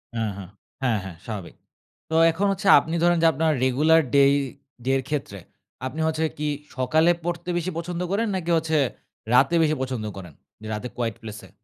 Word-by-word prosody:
হু, -, -, -2 dB, 0.2 s
হু। 100 Hz, -, -6 dB, 0.4 s
হ্যাঁ, 120 Hz, -4 st, +2 dB
হ্যাঁ 95 Hz, -3 st, -9 dB
স্বাভাবিক। 105 Hz, -6 st, -7 dB, 0.5 s
তো 160 Hz, -, -1 dB, 0.2 s
এখন 190 Hz, +5 st, -1 dB
হচ্ছে 195 Hz, +1 st, -3 dB
আপনি 165 Hz, +1 st, -4 dB
ধরেন 175 Hz, 0 st, +4 dB
যে 165 Hz, -, +7 dB
আপনার 160 Hz, +3 st, +1 dB
রেগুলার 150 Hz, +6 st, +4 dB
ডেই 140 Hz, 0 st, +6 dB, 0.5 s
ডে 135 Hz, -, +2 dB
এর -, -, -1 dB
ক্ষেত্রে 135 Hz, -9 st, -3 dB, 0.5 s
আপনি 140 Hz, +5 st, -5 dB
হচ্ছে 160 Hz, 0 st, -1 dB
কি 150 Hz, 0 st, -2 dB, 0.3 s
সকালে 155 Hz, +7 st, +3 dB
পড়তে 175 Hz, +1 st, -4 dB
বেশি 175 Hz, +2 st, -2 dB
পছন্দ 175 Hz, +1 st, -4 dB
করেন 220 Hz, +3 st, +1 dB
নাকি 175 Hz, -2 st, -2 dB
হচ্ছে 160 Hz, -1 st, 0 dB, 0.6 s
রাতে 135 Hz, +7 st, +5 dB
বেশি 155 Hz, -1 st, +2 dB
পছন্দ 130 Hz, -4 st, -3 dB
করেন? 90 Hz, -5 st, -9 dB, 0.3 s
যে 110 Hz, -, -8 dB
রাতে 105 Hz, +4 st, -4 dB
কোয়াইট 115 Hz, -3 st, -2 dB
প্লেসে? 105 Hz, -1 st, -9 dB
150 Hz, 180 wpm, -24 LUFS, 125-165 Hz, 0.6 s, যে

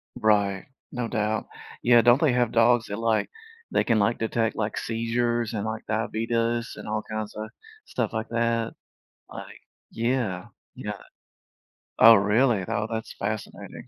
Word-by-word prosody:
Right. 105 Hz, -4 st, +1 dB, 0.2 s
No 120 Hz, -2 st, -3 dB
doubt. 110 Hz, -1 st, -1 dB, 0.3 s
Yeah 120 Hz, -1 st, +6 dB
don't 120 Hz, +3 st, +5 dB
they 150 Hz, -6 st, +3 dB
have 120 Hz, -2 st, +1 dB
dogs 115 Hz, 0 st, +4 dB
that, 100 Hz, -, -4 dB
like, 115 Hz, -1 st, 0 dB, 0.4 s
they -, -, +2 dB
can, 115 Hz, -, +2 dB
like, 110 Hz, +3 st, +1 dB
detect, 115 Hz, 0 st, 0 dB
like, 110 Hz, 0 st, -2 dB
seizures 115 Hz, 0 st, -1 dB
and, 105 Hz, 0 st, -2 dB
like, 110 Hz, 0 st, -4 dB
diabetes 115 Hz, +1 st, -1 dB
and -, -, -9 dB
all 110 Hz, 0 st, -1 dB
kinds 110 Hz, -1 st, -4 dB
of 110 Hz, 0 st, -6 dB, 0.4 s
stuff 115 Hz, -4 st, -3 dB
like 110 Hz, 0 st, -3 dB
that? 115 Hz, -1 st, 0 dB, 0.6 s
Like -, -, -10 dB, 0.3 s
Yeah, 115 Hz, -6 st, -1 dB, 0.3 s
yeah. -, -, -6 dB, 1.0 s
Oh, 115 Hz, 0 st, +10 dB
really? 105 Hz, +1 st, +3 dB
Oh 105 Hz, -1 st, -1 dB
that's 110 Hz, 0 st, -4 dB
fascinating. 105 Hz, +1 st, -6 dB
115 Hz, 145 wpm, -25 LUFS, 110-120 Hz, 1.0 s, Oh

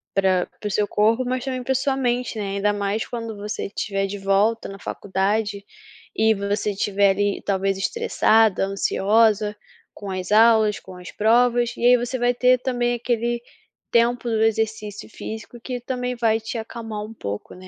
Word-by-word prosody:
para 190 Hz, -2 st, +2 dB
para 210 Hz, -, -4 dB
o -, -, -3 dB
seu 205 Hz, +1 st, +1 dB
corpo, 225 Hz, +5 st, +2 dB
mas 255 Hz, +1 st, -2 dB
também 255 Hz, -1 st, -3 dB
para 265 Hz, +1 st, 0 dB
sua 265 Hz, +1 st, +1 dB
mente, 245 Hz, -3 st, -1 dB
né, 200 Hz, -1 st, -3 dB
ainda 205 Hz, +1 st, +1 dB
mais 205 Hz, +1 st, -1 dB
quando 230 Hz, -2 st, -5 dB
você 210 Hz, +1 st, -4 dB
estiver 195 Hz, -1 st, -2 dB
de 200 Hz, +1 st, -5 dB
volta 200 Hz, +4 st, +1 dB
na 195 Hz, 0 st, -9 dB
faculdade, 200 Hz, +2 st, -2 dB, 0.5 s
e 220 Hz, 0 st, +4 dB
você 200 Hz, +1 st, -1 dB
tiver 200 Hz, 0 st, +2 dB
ali, 205 Hz, +1 st, 0 dB
talvez 195 Hz, -1 st, 0 dB
estressada, 220 Hz, -, +2 dB
ansiosa 210 Hz, +2 st, +2 dB, 0.4 s
com 205 Hz, -, -8 dB
as 185 Hz, 0 st, -4 dB
aulas, 220 Hz, -1 st, +5 dB
com 185 Hz, -, -12 dB
as 180 Hz, 0 st, -10 dB
provas, 240 Hz, +2 st, +2 dB
e 240 Hz, -, -1 dB
aí 250 Hz, 0 st, +7 dB
você 245 Hz, +2 st, -3 dB
vai 245 Hz, 0 st, +2 dB
ter 250 Hz, +1 st, +4 dB
também 245 Hz, -2 st, 0 dB
aquele 240 Hz, 0 st, -1 dB, 0.5 s
tempo 240 Hz, +1 st, +2 dB
do 220 Hz, -1 st, 0 dB
exercício 220 Hz, -2 st, -1 dB
físico, 220 Hz, +2 st, -8 dB
que 250 Hz, 0 st, -4 dB
também 250 Hz, 0 st, -3 dB
vai 225 Hz, -2 st, +2 dB
te 225 Hz, +2 st, -5 dB
acalmar 225 Hz, -1 st, -6 dB
um 225 Hz, -, -10 dB
pouco, 100 Hz, -, -6 dB
né, 185 Hz, +1 st, -12 dB
220 Hz, 175 wpm, -23 LUFS, 200-240 Hz, 0.5 s, aí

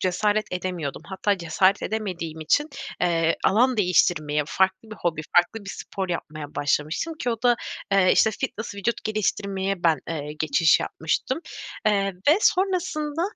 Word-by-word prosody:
cesaret 205 Hz, +3 st, +1 dB
edemiyordum. 180 Hz, -6 st, -4 dB
Hatta 195 Hz, +1 st, -1 dB
cesaret 185 Hz, +3 st, +2 dB
edemediğim 175 Hz, -7 st, -4 dB
için, 295 Hz, -, +2 dB, 0.3 s
eee, 165 Hz, -2 st, +2 dB
alan 245 Hz, +5 st, +4 dB
değiştirmeye 155 Hz, -6 st, +2 dB
farklı 190 Hz, +5 st, 0 dB
bir 215 Hz, -, -8 dB
hobi 165 Hz, -3 st, -1 dB, 0.2 s
farklı 200 Hz, +5 st, +3 dB
bir 195 Hz, -, -6 dB
spor 190 Hz, -1 st, -5 dB
yapmaya 155 Hz, -3 st, -5 dB
başlamıştım 155 Hz, -, -1 dB
ki 245 Hz, -, 0 dB
o 230 Hz, 0 st, -4 dB
da, 240 Hz, -1 st, +4 dB, 0.4 s
eee, 190 Hz, -2 st, +5 dB
işte, 220 Hz, -, +4 dB
fitness, 220 Hz, 0 st, -4 dB
vücut 200 Hz, +4 st, -2 dB
geliştirmeye 195 Hz, -3 st, -1 dB
ben, 160 Hz, -2 st, +4 dB
eee, 150 Hz, -2 st, -4 dB
geçiş 160 Hz, +1 st, +4 dB
yapmıştım. 160 Hz, -, -2 dB, 0.5 s
Eee, 195 Hz, -2 st, +2 dB, 0.2 s
ve 310 Hz, +6 st, +6 dB
sonrasında, 345 Hz, -6 st, +1 dB
190 Hz, 145 wpm, -24 LUFS, 165-220 Hz, 0.5 s, ve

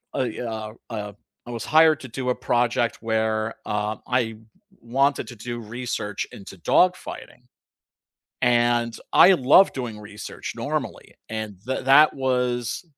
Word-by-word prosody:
a, 125 Hz, -2 st, -2 dB
uh, 110 Hz, -1 st, -6 dB, 0.2 s
uh 105 Hz, -3 st, -5 dB, 0.3 s
I 120 Hz, -, -8 dB
was 120 Hz, 0 st, -5 dB
hired 155 Hz, -1 st, +5 dB
to 130 Hz, -, -8 dB
do 125 Hz, +2 st, -4 dB
a 125 Hz, -, +1 dB
project 120 Hz, -1 st, 0 dB
where, 110 Hz, 0 st, -1 dB
uh, 105 Hz, 0 st, -2 dB
I 125 Hz, -1 st, +2 dB
w 110 Hz, 0 st, -17 dB, 0.4 s
wanted 135 Hz, +4 st, +1 dB
to 120 Hz, -, -9 dB
do 120 Hz, +2 st, -6 dB
research 110 Hz, -2 st, -4 dB
into 95 Hz, -1 st, -11 dB
dogfighting, 180 Hz, -, 0 dB, 1.0 s
and 120 Hz, -1 st, +2 dB, 0.2 s
I 190 Hz, -, +8 dB
love 175 Hz, +5 st, +5 dB
doing 120 Hz, -5 st, -5 dB
research 105 Hz, 0 st, -8 dB
normally -, -, -4 dB
and 110 Hz, -2 st, -5 dB
th 130 Hz, -1 st, -2 dB
that 145 Hz, +3 st, +6 dB
was 125 Hz, +1 st, -1 dB
120 Hz, 140 wpm, -24 LUFS, 110-130 Hz, 1.0 s, I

